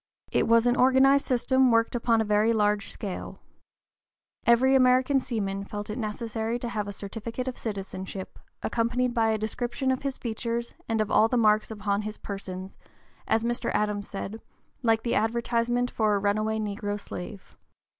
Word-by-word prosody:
It - - +2
was 230 +1 +5
an 245 0 +3
organized 265 +2 +5
system 260 +1 +3
worked 230 -1 +3
upon 230 -2 +2
a - - 0
very 210 +2 +3
large 210 -2 +1
scale. 195 -3 -6 1.1
Every 245 +3 +5
American 255 +1 +4
seaman 200 -6 -3
felt 205 +1 -6
it 215 - -5
necessary 225 +1 -2
to 240 -1 -4
have 210 -3 -3
a - - -4
certificate 225 +5 -6
of 255 - -3
citizenship, 190 -2 -6 0.2
accompanied 240 +2 0
by 225 -2 +2
a 220 - +1
description 240 +4 -2
of 260 - -1
his 275 -1 -3
features 235 0 -3 0.2
and 225 -1 +1
of 215 - -2
all 220 - +5
the 245 - 0
marks 215 -2 +3
upon 205 -2 -1
his 215 0 -6
person, 190 -2 -6 0.6
as 220 0 +2
Mr. 240 0 -1
Adams 210 -1 0
said, 205 +2 -6 0.4
"like 225 -2 +2
the 235 - 0
advertisement 235 +2 +1
for 215 -2 +2
a - - +1
runaway 215 +2 0
negro 205 -1 -3
slave." 95 - -8
225 Hz, 165 wpm, -27 LUFS, 210-240 Hz, 1.1 s, was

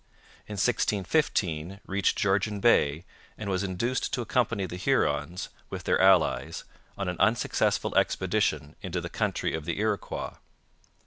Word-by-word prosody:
In 105 - -6
1615 95 - 0
reached 100 0 +1
Georgian 100 +1 +1
Bay 80 -8 +3 0.3
and 105 -2 -4
was 95 -1 0
induced 100 +7 -1
to 125 - 0
accompany 110 -4 0
the 90 - -6
Hurons, 90 -2 0 0.2
with - - -6
their - - +2
allies, 95 -5 +3 0.3
on 100 - -2
an 90 -1 -3
unsuccessful 110 +5 +1
expedition 75 +2 +1
into 90 -1 -3
the 85 0 -5
country - - -1
of 80 -2 -4
the - - -2
Iroquois. - - -2
95 Hz, 135 wpm, -28 LUFS, 85-105 Hz, 0.3 s, Bay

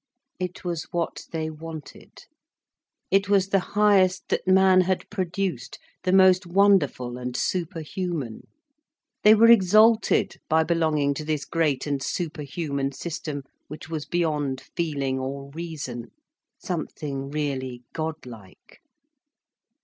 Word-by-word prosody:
It 180 0 -5
was 170 -3 -3
what 170 -1 -3
they 160 -1 -3
wanted. 155 -1 -10 0.9
It 195 +1 +3
was 195 -2 +3
the 195 - +3 0.2
highest 195 -3 +3
that - - -1
man 190 0 +6
had 185 0 -1
produced, 185 - -3 0.2
the 185 - 0
most 185 -1 +5
wonderful 170 -10 +2
and 125 0 -4
superhuman. 165 - -3 0.7
They 215 +1 +7
were 230 +2 +7
exalted 215 +2 +4
by 160 0 +4
belonging 155 -3 +1
to 155 - -5
this 150 -1 -2
great 155 -6 0
and 140 -2 -2
superhuman 140 -3 -3
system 150 -1 -5 0.2
which 150 0 -9
was 155 -2 -4
beyond 150 -6 -1 0.2
feeling 140 -5 -1
or 140 +1 -5
reason, 145 -7 -6 0.5
something 145 -5 -4
really 130 -4 -3
godlike. 125 - -8
160 Hz, 115 wpm, -25 LUFS, 140-185 Hz, 0.9 s, They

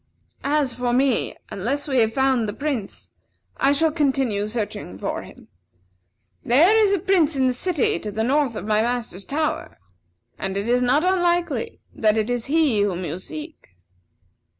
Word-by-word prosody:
As 285 -3 +1
for 245 0 -1
me, 260 0 +1 0.2
unless 270 +10 -2
we 265 -3 +1
have 220 -1 +3
found 260 -3 +1
the - - -4
Prince, 275 -9 -4 0.5
I 275 - +3
shall 315 +2 +2
continue 265 -9 0
searching 210 - -4
for - - -3
him. - - -14 1.0
There 320 - +5
is 430 -3 +4
a 400 - +3
prince 345 -5 +2
in 265 -1 +2
the 255 - +2
city 285 - 0
to 210 - -5
the 220 +2 -1
north 270 -1 +1
of 210 - -5
my 215 0 +2
master's 235 -5 -3
tower, 305 +6 -2 0.6
and 195 0 -3
it 200 +2 -2
is 245 +1 +2
not 255 +5 +3
unlikely 355 +4 0
that 215 0 +2
it 220 +2 0
is 245 -1 -2
he 285 -8 +2
whom 185 -3 -1
you 165 +3 -4
seek." 300 - -10
255 Hz, 170 wpm, -23 LUFS, 220-305 Hz, 1.0 s, There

